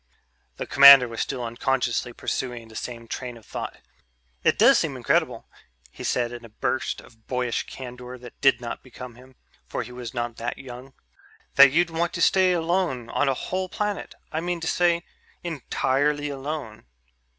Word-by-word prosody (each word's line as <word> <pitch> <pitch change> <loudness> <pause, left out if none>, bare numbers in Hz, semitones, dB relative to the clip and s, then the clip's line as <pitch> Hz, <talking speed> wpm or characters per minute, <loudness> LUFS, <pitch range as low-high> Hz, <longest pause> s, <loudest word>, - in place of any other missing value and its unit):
The - - -4
commander 140 -2 +9
was 115 -1 -4
still 130 -3 -3
unconsciously 120 +1 -1
pursuing 120 -2 -4
the 110 - -14
same 115 -1 -6
train 125 0 -6
of 110 - -17
thought. - - -6 0.7
"It - - +3
does - - +6
seem - - -2
incredible," - - 0 0.4
he - - -10
said 120 -1 0
in 120 0 -8
a 115 - -11
burst 130 +4 -2
of 110 -1 -21
boyish 125 -2 -1
candor 125 -1 -8
that 120 -1 -13
did 135 -2 +5
not 120 -1 -6
become 125 -1 -10
him, 130 +2 -17 0.3
for - - -3
he - - -11
was 125 -2 -7
not 120 -1 -4
that 120 +1 -4
young, 130 +1 -10 0.6
"that 140 -1 +8
you'd 170 +3 +2
want 170 +1 -1
to - - -3
stay 185 -1 +4
alone 170 -8 0
on 145 - +1
a 135 - +1
whole 185 +7 -3
planet. 210 0 -3 0.2
I 160 - -2
mean 175 0 -2
to 165 - -3
say 170 0 +2 0.4
entirely 145 -2 0
alone.... 135 - -6
130 Hz, 175 wpm, -25 LUFS, 120-155 Hz, 0.7 s, commander